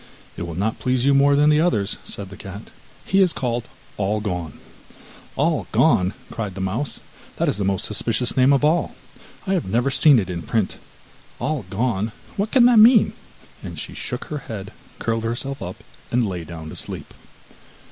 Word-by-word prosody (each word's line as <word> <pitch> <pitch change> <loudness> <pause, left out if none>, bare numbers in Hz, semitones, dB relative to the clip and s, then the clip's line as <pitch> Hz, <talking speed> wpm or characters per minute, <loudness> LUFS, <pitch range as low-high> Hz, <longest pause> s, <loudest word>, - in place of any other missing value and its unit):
'It - - -7
will 85 -1 -5
not 105 +5 -1
please 130 0 0
you 140 - +5
more 140 +1 +5
than 150 +1 +5
the 150 +1 +4
others,' 110 - +1
said 100 -2 -6
the - - -8
cat. 100 +3 -9 0.3
'He 195 +1 +3
is 180 -3 +4
called 120 -2 -2 0.3
All 105 +1 0
gone.' 90 -7 -4 0.8
'All - - +1
gone,' 90 +2 +3 0.2
cried 105 -5 -4
the - - -6
mouse 105 +9 -3 0.4
'that - - 0
is - - +1
the 100 - -1
most 95 -1 0
suspicious 115 +3 0
name 130 +1 +5
of 140 +1 +3
all! 165 +3 +1 0.5
I 195 - 0
have 175 - -1
never 120 +6 +1
seen 145 0 +6
it 100 -5 0
in 90 -2 -4
print. 110 -1 -1 0.6
All 145 -8 -2
gone; 110 0 -1 0.2
what 200 +2 -1
can 245 -1 +5
that 240 -2 +7
mean?' 225 +1 +7 0.5
and - - -8
she - - -5
shook - - -4
her 150 -4 -4
head, 105 -5 -7 0.2
curled 115 0 -1
herself 130 +4 -3
up, 90 0 -5 0.3
and 120 -2 +1
lay 90 -3 -4
down 80 -1 -8
to - - -8
sleep. - - -7
115 Hz, 190 wpm, -22 LUFS, 95-140 Hz, 0.8 s, that